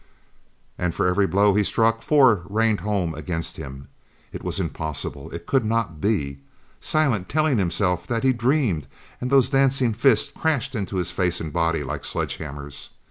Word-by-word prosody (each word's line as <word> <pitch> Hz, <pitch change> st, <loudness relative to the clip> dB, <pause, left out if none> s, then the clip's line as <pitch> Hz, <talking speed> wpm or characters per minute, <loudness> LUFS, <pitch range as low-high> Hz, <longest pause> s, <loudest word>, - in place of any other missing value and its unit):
And 90 Hz, -1 st, -1 dB
for -, -, 0 dB
every 95 Hz, +2 st, +3 dB
blow 100 Hz, +1 st, +3 dB
he 105 Hz, +1 st, +3 dB
struck 115 Hz, +2 st, +1 dB
four 130 Hz, -, +4 dB
rained 110 Hz, 0 st, +2 dB
home 100 Hz, -6 st, -1 dB
against 80 Hz, +2 st, -4 dB
him. 70 Hz, -3 st, -8 dB, 0.5 s
It -, -, -7 dB
was -, -, -3 dB
impossible! 75 Hz, -2 st, -4 dB
It 85 Hz, 0 st, -8 dB
could 135 Hz, -3 st, +2 dB
not 110 Hz, -8 st, -1 dB
be! 70 Hz, -11 st, 0 dB, 0.4 s
Silent 130 Hz, -12 st, 0 dB
telling 155 Hz, -5 st, +2 dB
himself 90 Hz, 0 st, 0 dB
that 115 Hz, 0 st, -1 dB
he 130 Hz, -1 st, +4 dB
dreamed, 120 Hz, -, +1 dB, 0.3 s
and 125 Hz, -, -2 dB
those 135 Hz, -1 st, +4 dB
dancing 135 Hz, -3 st, +3 dB
fists 115 Hz, 0 st, +3 dB
crashed 140 Hz, -4 st, 0 dB
into 100 Hz, -4 st, -3 dB
his 90 Hz, -2 st, -1 dB
face 90 Hz, -2 st, 0 dB
and 80 Hz, -2 st, -5 dB
body 85 Hz, -2 st, +1 dB
like 65 Hz, -, -4 dB
sledgehammers. 70 Hz, 0 st, -4 dB
100 Hz, 165 wpm, -23 LUFS, 85-125 Hz, 0.5 s, four